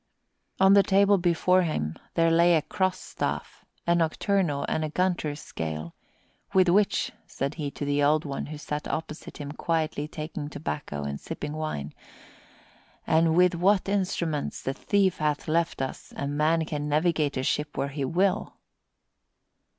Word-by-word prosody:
On 190 +1 +7
the 200 - +8
table 200 0 +4
before 180 +1 +3
him 80 - -2 0.2
there 165 -1 +4
lay 170 +1 +5
a 155 - +2
cross 185 -2 0
staff, - - -4 0.2
a 170 - +3
nocturnal 170 -2 +1
and 155 - 0
a 155 - -2
Gunter's 165 -3 -1
scale, 80 - -5 0.6
"with 185 -2 +5
which," 200 +3 +2 0.2
said 140 +2 -3
he, 145 - -1
to 145 - -5
the 145 0 +1
Old 150 +2 +3
One, 140 -1 -4
who 150 0 -6
sat 150 0 -4
opposite 155 0 -5
him 145 -1 -6
quietly 155 -2 -1
taking 155 -1 -6
tobacco 145 - -4
and 70 0 -4
sipping 150 0 -5
wine, 155 - -4 1.1
"and 160 0 +3
with 180 0 +5
what 185 +3 +2
instruments 180 -6 -1
the 135 - -1
thief 195 +3 +1
hath 150 0 -1
left 165 -3 0
us, 130 - -6
a 140 - -2
man 155 +3 +1
can 150 -1 -3
navigate 155 -2 +1
a 130 - -1
ship 150 +2 -1
where 140 +1 0
he 140 0 -3
will." 185 +8 0
155 Hz, 160 wpm, -27 LUFS, 145-180 Hz, 1.1 s, the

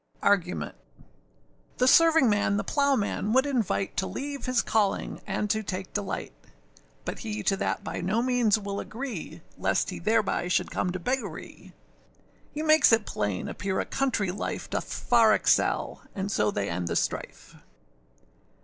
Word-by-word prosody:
] - - -22
ARGUMENT. 180 -3 +1 1.0
The 250 - +3
servingman 255 -10 +5
the - - -1
plowman 270 -7 +1
would 260 +2 +4
invite 235 -8 -1
To 190 - 0
leave 280 -2 -5
his 255 -3 +2
calling 210 -3 0
and 210 - -1
to 220 - 0
take 190 -2 -5
delight; 205 -2 -3 0.7
But - - -4
he 215 -2 -4
to 195 - +2
that - - -2
by - - -4
no 205 +6 0
means 245 -4 +3
will 200 -1 -4
agree, 255 +3 -6 0.2
Lest - - +1
he - - -6
thereby 215 -5 +1
should 180 - 0
come 180 - -1
to 185 - -3
beggary. 255 +8 -4 0.8
He 300 +1 -4
makes 310 -3 +6
it 225 -2 +4
plain 100 -3 -2
appear 190 -1 -2
a - - -1
country 230 -8 0
life 195 - -5
Doth - - -3
far 230 -3 +4
excel: - - +1
and 200 0 -3
so 105 - +2
they 100 -1 -2
end 85 0 -3
the - - -2
strife. - - -3
215 Hz, 160 wpm, -27 LUFS, 195-255 Hz, 1.0 s, makes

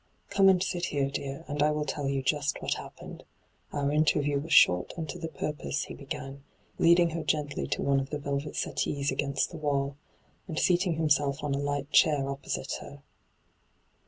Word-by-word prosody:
' - - -40
Come 195 -1 +6
and 185 -1 +4
sit 175 -2 -2
here, 140 -2 -1
dear, 140 +3 -5
and 145 0 -2
I 150 - +5
will 150 0 -1
tell 145 -2 -3
you 135 -1 -1
just 145 +1 0
what - - -1
happened. - - -9 0.5
Our 140 0 0
interview 145 -1 +2
was 160 +4 -7
short 90 - +5
and 160 -2 -3
to 135 - -6
the 165 - -3
purpose,' 150 -1 -3
he - - -8
began, 135 0 -7 0.4
leading 170 0 +5
her 165 +1 -3
gently 150 -2 -1
to - - -2
one 140 -1 +3
of 135 0 -4
the 150 - -2
velvet 140 +1 -3
settees 140 0 -1
against 140 0 -1
the 170 - -7
wall, 140 -2 -1 0.5
and 160 -4 -5
seating 175 -1 +2
himself 145 -3 +1
on 145 -1 -1
a 140 - 0
light 145 0 -2
chair 145 -4 +4
opposite 135 -1 -3
her. 140 0 -11
145 Hz, 190 wpm, -29 LUFS, 140-155 Hz, 0.5 s, Come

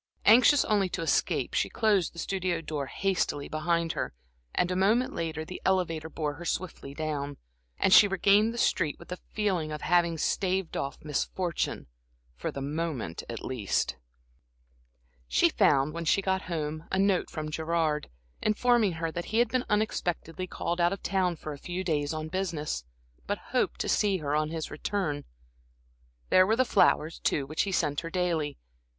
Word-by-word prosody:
Anxious 250 +6 +7
only 200 -3 +2
to 165 - -3
escape, 165 - +1
she - - +1
closed 205 -6 +2
the - - -16
studio 185 -1 -1
door 150 -4 -4
hastily 175 -4 -1
behind 165 +1 0
her, - - -4 0.4
and 180 - +1
a - - 0
moment 215 +7 +2
later 160 -1 -3
the 180 - -8
elevator 165 -4 0
bore 150 -2 -2
her 165 +4 -9
swiftly 170 -5 -4
down, 145 -2 -3 0.4
and 190 - +3
she 205 - +9
regained 200 +3 +4
the 235 - -7
street, 170 -9 +1
with 170 - -14
the 180 - -5
feeling 185 -7 0
of 150 - -5
having 170 -1 +3
staved 185 +2 0
off 140 - -3
misfortune, 165 +3 -2 0.5
for - - -4
the 140 - -5
moment 145 - -3
at 115 - -5
least. 120 -7 -1 1.3
She - - +4
found, 140 +1 +3
when 170 0 -4
she 160 - +3
got 190 0 +1
home, 155 -1 -3
a 190 - +1
note 195 -1 +2
from 155 -1 -5
Gerard, 160 -1 0 0.3
informing 220 -2 +3
her 165 0 -3
that 170 +1 -4
he 220 - -2
had 240 -1 +4
been 255 +1 0
unexpectedly 185 -4 -1
called 175 0 -2
out 170 0 +4
of 195 - -7
town 185 -3 +1
for 155 -1 -6
a 140 - -10
few 180 +4 -4
days 150 -5 0
on 155 0 -3
business, 155 - -3 0.4
but - - 0 0.2
hoped - - +1
to - - -2
see 200 -2 +2
her 150 -3 -2
on 155 0 +1
his 160 -1 -4
return. 155 -8 -2 1.0
There 185 0 +6
were 220 - +3
the 255 +2 +3
flowers, 165 -7 +3
too, 140 - 0
which 155 +3 -1
he 200 - -1
sent 150 -5 +1
her 165 - -5
daily. 165 -5 -1
170 Hz, 175 wpm, -29 LUFS, 155-190 Hz, 1.3 s, she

